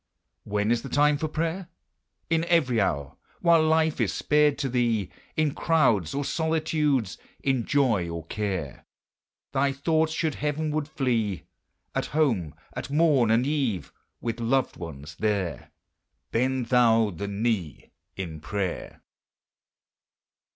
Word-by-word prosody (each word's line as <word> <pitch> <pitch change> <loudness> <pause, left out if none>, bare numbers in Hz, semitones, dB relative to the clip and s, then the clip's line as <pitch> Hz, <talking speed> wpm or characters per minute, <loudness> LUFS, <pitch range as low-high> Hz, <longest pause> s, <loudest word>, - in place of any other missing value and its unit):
When 105 +2 0
is 120 -1 +2
the 135 - -7
time 145 +2 +3
for 155 - -1
prayer? 165 +4 -2 0.6
In 165 0 +1
every 145 -10 +3
hour, 70 -6 -1 0.2
while 170 -2 +5
life 160 0 +2
is - - +1
spared 150 -1 +2
to 135 - -1
thee 120 -6 0 0.3
In 155 -2 +2
crowds 115 - +2
or 140 0 -1
solitudes 155 - 0 0.2
in 130 -4 +1
joy 115 -12 +2
or 85 -1 -5
care 95 - -4 0.6
Thy 140 0 +2
thoughts 160 +3 +1
should 160 -1 -1
heavenward 150 +1 -2
flee. 115 - -1 0.5
At - - -1
home 110 - +1 0.2
at - - -5
morn 145 -6 +3
and 115 +3 +3
eve 135 - -1 0.3
with 115 0 -3
loved 125 +2 +1
ones 80 -3 -8
there, 100 -5 -1 0.6
Bend 125 0 0
thou 115 -4 +4
the 95 +4 -5
knee 100 - -2 0.2
in 85 -5 -5
prayer! 95 +3 -4
125 Hz, 130 wpm, -26 LUFS, 100-150 Hz, 0.6 s, while